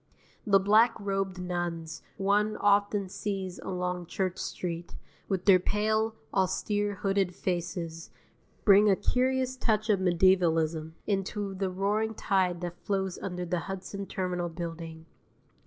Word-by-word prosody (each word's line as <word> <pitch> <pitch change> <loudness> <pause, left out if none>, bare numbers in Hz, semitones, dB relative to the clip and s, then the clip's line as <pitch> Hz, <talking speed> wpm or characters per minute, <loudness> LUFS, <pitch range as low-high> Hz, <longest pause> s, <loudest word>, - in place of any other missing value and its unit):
The 195 -1 +6
black 215 +4 +4
robed 195 -2 -2
nuns 175 -3 -4 0.2
one 205 +2 +2
often 205 -1 +2
sees 190 -1 -4
along 180 -2 -3
Church 185 0 -2
Street, 170 -1 -4 0.3
with 190 -2 -1
their 190 -2 +7
pale, 215 +3 0 0.2
austere, 205 +2 0
hooded 195 -1 0
faces, 170 -2 -3 0.6
bring 205 0 +7
a 195 - +5
curious 260 +3 0
touch 220 -3 +1
of 200 - +2
medievalism 170 -3 +2
into 200 0 -2
the 190 0 -1
roaring 210 +4 0
tide 185 -4 +1
that 175 0 -5
flows 190 -2 -1
under 180 -2 -4
the 175 0 -1
Hudson 195 +1 -5
Terminal 180 -2 -2
Building. 165 -1 -7
190 Hz, 125 wpm, -29 LUFS, 175-205 Hz, 0.6 s, their